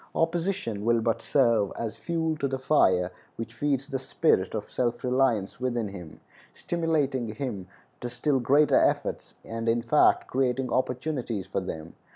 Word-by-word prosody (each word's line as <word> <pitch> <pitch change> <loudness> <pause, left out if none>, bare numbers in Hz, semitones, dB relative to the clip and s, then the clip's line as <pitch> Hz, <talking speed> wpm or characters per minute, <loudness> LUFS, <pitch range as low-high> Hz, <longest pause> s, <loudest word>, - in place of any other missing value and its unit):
Opposition 165 - -1
will 115 +1 +3
but 115 0 0
serve 115 -7 +2
as 115 -2 -3
fuel 165 -2 -1
to 140 - 0
the 135 0 -2
fire 95 -10 +3 0.2
which 115 0 -6
feeds 135 +2 -1
the 135 -2 -3
spirit 130 - +1
of 105 - -5
self 120 -1 -1
reliance 125 -6 +1
within 120 -4 -1
him, 90 -5 -10 0.3
stimulating 150 -7 -1
him 110 -8 -4 0.3
to 125 - -4
still 140 +2 0
greater 145 +5 +3
efforts, - - +1
and, 115 0 -3
in 115 +1 +1
fact, 135 +6 +4
creating 130 0 0
opportunities 125 -5 -1
for - - -2
them. 80 +1 -6
125 Hz, 155 wpm, -27 LUFS, 115-140 Hz, 0.3 s, fact